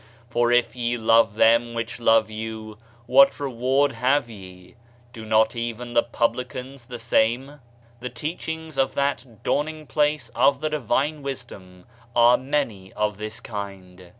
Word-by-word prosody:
For 120 0 +2
if 120 0 +2
ye 120 0 -1
love 115 -2 +3
them 115 +1 +3
which 115 +1 -4
love 115 -2 +4
you, 110 -1 -7 0.3
what 135 +3 +5
reward 135 +1 +1
have 130 +3 +1
ye? 95 -3 -13 0.4
do 115 -2 -9
not 110 +2 +3
even 120 +1 -4
the 120 - +5
publicans 125 +2 -3
the 125 -1 -7
same?" 120 +5 0 0.4
The 125 +1 -5
teachings 160 +4 -5
of 135 - +1
that 135 -5 -2
Dawning 155 +1 -1
place 150 -4 0
of 140 +2 +3
the 155 +1 -2
divine 145 +2 0
wisdom 100 -10 -8 0.3
are 120 +1 +6
many 130 -8 -2
of 105 -1 -2
this 110 0 -5
kind. 95 -4 -8
120 Hz, 145 wpm, -24 LUFS, 110-135 Hz, 0.4 s, are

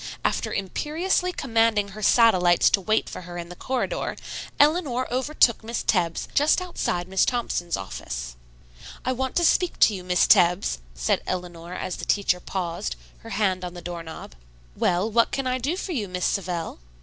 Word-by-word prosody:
After - - 0
imperiously 325 - -1
commanding 225 - +1
her 210 +2 -9
satellites 185 -6 +5
to 200 - +3
wait 215 +3 +1
for - - -7
her 175 0 -8
in 170 0 -6
the 180 - -9
corridor, 260 +7 -2 0.4
Eleanor 290 -5 +3
overtook 260 -3 +2
Miss 230 +1 -3
Tebbs 170 -5 0
just 295 +4 +4
outside 235 - -2
Miss 190 0 +2
Thompson's 175 -8 -1
office. - - -6 0.7
"I 255 - +1
want 260 0 -2
to 345 - +3
speak 360 +1 +2
to 215 - +6
you, 185 -2 -6
Miss 180 0 +3
Tebbs," 175 - +4 0.2
said - - 0
Eleanor 175 -1 -5
as 185 - -4
the - - -6
teacher 195 -3 +1
paused, 170 - -4 0.2
her - - -11
hand 190 -3 0
on 180 0 -6
the - - -7
doorknob. 165 - -7 0.4
"Well, 180 +3 +1
what 230 +1 +3
can 275 - -2
I 255 0 0
do 290 +9 -1
for 380 - -4
you, 230 - -2
Miss 180 0 -3
Savell?" 175 - -2
200 Hz, 175 wpm, -25 LUFS, 175-255 Hz, 0.7 s, to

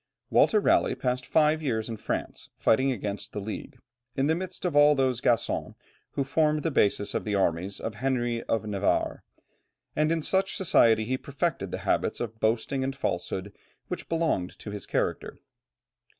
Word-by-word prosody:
Walter 215 - +5
Raleigh - - +3
passed 125 0 -2
five 155 0 +3
years 110 -7 -1
in 115 - -4
France - - -4
fighting 130 +4 +3
against 105 -4 -4
the - - -3
League, 110 +6 -6 0.4
in 135 - +1
the 155 - +3
midst 185 +2 -5
of 175 - 0
all 145 0 +7
those 130 -3 +1
Gascons 115 -2 0 0.4
who 140 - 0
formed 150 +2 +1
the 165 - 0
basis 100 -5 +2
of - - -1
the 105 -1 -1
armies 95 0 0
of 110 - -4
Henry 120 0 -1
of 115 -1 -1
Navarre, 100 -2 0 0.7
and 155 +1 +2
in 165 -2 0
such 190 +3 +1
society 115 - +4
he 130 +3 -1
perfected 140 - -2
the - - -3
habits - - +1
of 110 -2 -5
boasting 115 +5 0
and 135 +1 -2
falsehood 95 -4 -3 0.4
which - - -5
belonged 160 - 0
to 105 - -8
his 100 -2 -6
character. - - -2
125 Hz, 170 wpm, -27 LUFS, 110-150 Hz, 0.7 s, all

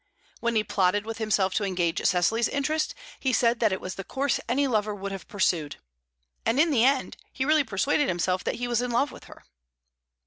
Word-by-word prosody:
When 235 -1 -1
he 215 - +3
plotted 205 0 +1
with 225 0 -6
himself 205 -4 +1
to 215 - 0
engage 180 -3 -1
Cecily's 220 +6 +2
interest, 305 +3 -1 0.2
he 265 - 0
said 235 -1 +2
that 220 -3 +3
it 190 - -1
was 185 - -6
the 195 - -6
course 270 +5 -1
any 280 +2 +2
lover 215 -5 0
would 200 0 -5
have 195 -1 -7
pursued. 175 -8 0 0.7
And 230 +4 +1
in 325 +1 +4
the 235 -5 +3
end 265 +1 +1
he 260 - -2
really 305 0 +4
persuaded 270 +7 +1
himself 185 +1 0
that - - -1
he 245 +1 -3
was 240 -1 +1
in 250 - -2
love 245 +5 +1
with - - -13
her. - - -14
225 Hz, 210 wpm, -26 LUFS, 195-260 Hz, 0.7 s, in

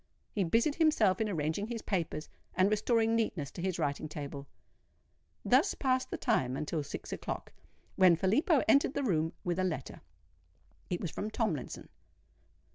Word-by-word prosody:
He 200 - 0
busied 230 - +2
himself 285 - +3
in 215 - +1
arranging 160 +3 -1
his 230 -1 -5
papers, 165 -5 -2 0.3
and 185 +3 +3
restoring 225 +1 +2
neatness 180 -11 -1
to 175 - -7
his 185 -1 -1
writing 150 -1 -2
table. 140 -2 -6 1.0
Thus - - +4
passed 260 -1 0
the - - -3
time 130 - +1
until 155 +2 -2
six 140 - -6
o'clock, - - -5 0.4
when 185 -3 +7
Filippo 260 - +3
entered 280 -1 +4
the 285 - 0
room 165 -8 +1
with 175 0 -1
a - - +2
letter. 160 -8 -3 0.9
It 175 - -2
was 170 - -3
from 215 - -4
Tomlinson. 215 - -3
185 Hz, 155 wpm, -32 LUFS, 155-225 Hz, 1.0 s, when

